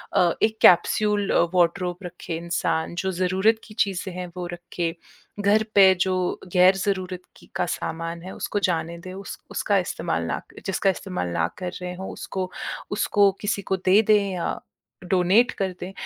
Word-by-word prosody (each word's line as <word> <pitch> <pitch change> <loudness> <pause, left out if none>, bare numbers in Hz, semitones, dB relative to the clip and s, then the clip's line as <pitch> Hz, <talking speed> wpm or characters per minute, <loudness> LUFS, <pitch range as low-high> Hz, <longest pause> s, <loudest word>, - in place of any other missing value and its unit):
अ, 175 -1 +4
एक 220 0 +2
कैप्सूल 205 +3 +4
अ, - - +3
वॉडरॉब 180 0 +1
रखे 175 -1 -6
इंसान, 170 -1 -1
जो 190 +1 -1
ज़रूरत 190 +5 +2
की 215 - -13
चीज़ें 190 -2 0
हैं, 180 -1 -4
वो 175 -1 -3
रखे। 175 -1 -4 0.4
घर 205 +2 +3
पे 190 -1 +8
जो 190 -1 +2 0.4
गैर 185 +1 +6
ज़रूरत 185 -2 -2 0.2
की - - -18
का 180 - +1
सामान 165 0 -4
है, 190 - -7
उसको 205 - -2
जाने 165 0 -2
दे, 185 +1 -9
उस 195 +1 -7
उसका - - +1
इस्तेमाल - - -2
ना - - -2
क - - -13
जिसका 195 +1 +1
इस्तेमाल 185 - -3
ना 85 -1 0
कर 180 -1 -3
रहे 180 0 -4
हों, 190 +1 -6
उसको 185 -1 -5 0.4
उसको 205 -1 +3
किसी 205 -1 -1
को 190 0 -1
दे 195 +4 +6
दें 205 -2 +3
या 175 - -2 0.5
डोनेट 190 +6 +4
कर 190 -2 -2
दें। 185 +2 -6
185 Hz, 175 wpm, -24 LUFS, 175-200 Hz, 0.5 s, पे